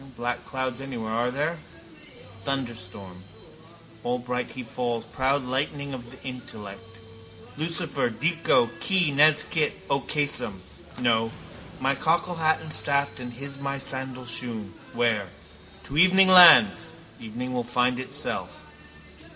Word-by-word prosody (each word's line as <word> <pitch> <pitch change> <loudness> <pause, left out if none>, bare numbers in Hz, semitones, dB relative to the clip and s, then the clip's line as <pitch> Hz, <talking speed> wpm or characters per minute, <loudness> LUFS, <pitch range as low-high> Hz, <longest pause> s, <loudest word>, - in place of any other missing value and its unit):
No - - -15
black 120 0 -3
clouds 130 -1 -4
anywhere, 120 -5 -5
are 120 +2 0
there? 150 +6 -2 0.9
Thunderstorm. 100 -8 -5 0.8
Allbright 125 0 -2
he 130 - -7
falls, 120 0 -3
proud 135 +1 0
lightning 140 +2 -3
of 120 -2 -8
the 130 - -15
intellect, 115 -3 -9 0.6
Lucifer, 165 -3 -1
dico, 150 -1 +2
qui 185 -6 +1
nescit 155 +1 +3 0.2
occasum. 140 -7 -1 0.4
No. 115 -2 +1 0.5
My 135 +1 +1
cockle 170 +5 0
hat 160 -1 +2
and 160 -1 -4
staff 140 -1 0
and 125 -1 -7
hismy 140 +2 -6
sandal 130 -1 -5
shoon. 110 -2 -4 0.2
Where? 115 -5 +1 0.6
To 140 - -8
evening 185 +3 +6
lands. 165 - +8 0.3
Evening 120 +3 -6
will 125 -1 -1
find 125 +1 0
itself. 130 -10 -5
130 Hz, 120 wpm, -25 LUFS, 120-145 Hz, 0.9 s, lands